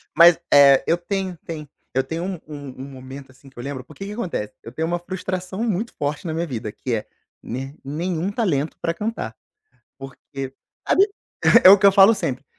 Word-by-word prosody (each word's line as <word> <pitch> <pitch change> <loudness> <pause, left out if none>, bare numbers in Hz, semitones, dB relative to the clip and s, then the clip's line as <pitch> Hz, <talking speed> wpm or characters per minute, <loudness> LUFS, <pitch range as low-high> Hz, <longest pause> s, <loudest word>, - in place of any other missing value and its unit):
mas, 170 0 +8 0.2
eh, 140 -1 +7
eu 165 - +3
tenho 185 0 -3
tem 155 -3 -6 0.3
eu 130 - +3
tenho 165 +2 -4
um 190 0 -3
um 145 -3 -8
um - - -5
momento 130 0 -10
assim 135 +1 -18
que 130 - -29
eu 120 - -6
lembro, 135 -2 -5
porque 155 +8 -10
que 200 - -6
acontece, 180 - -4
eu 115 - -10
tenho 160 +5 -2
uma 175 +1 -1
frustração 185 +3 -4
muito 220 +1 -1
forte 150 +4 -3
na 160 - -2
minha 165 +2 -1
vida 110 -7 -5
que 125 - -4
é, 110 - -2 0.3
nem 135 +4 -6
nenhum 170 +6 -2
talento 165 - -1
pra 165 - -1
cantar, 215 +6 -4 0.6
porque, 135 0 -8 0.3
sabe, 395 +2 +5 0.6
é 185 - +11
o 200 +1 +9
que 200 - +3
eu 200 - +8
falo 195 +3 +7
sempre, 135 - -3
160 Hz, 200 wpm, -22 LUFS, 135-185 Hz, 0.6 s, é